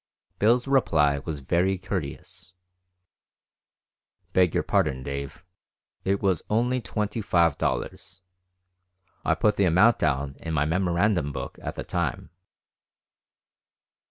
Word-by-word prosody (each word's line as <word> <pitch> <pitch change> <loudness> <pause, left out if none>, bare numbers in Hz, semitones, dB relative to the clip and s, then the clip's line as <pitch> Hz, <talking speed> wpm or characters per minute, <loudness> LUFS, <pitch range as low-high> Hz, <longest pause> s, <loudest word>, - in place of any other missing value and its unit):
Bill's 120 +4 +3
reply 75 - +3
was 75 0 -6
very 90 +7 +1
courteous: 90 -1 -6 1.8
"Beg 90 -3 +3
your - - +2
pardon, 65 -1 0
Dave, 70 +4 -6 0.6
it 100 +1 0
was 95 -5 +2
only 125 +4 +1
twenty 105 0 -3
five 85 -6 +2
dollars; 95 - -3 1.0
I - - +2
put 105 -1 +1
the 100 - +3
amount 95 +7 +4
down 70 -1 -1
in 80 -1 -4
my 75 0 +2
memorandum 90 -1 +1
book - - -6
at - - -5
the - - -5
time." - - -3
90 Hz, 115 wpm, -26 LUFS, 75-105 Hz, 1.8 s, amount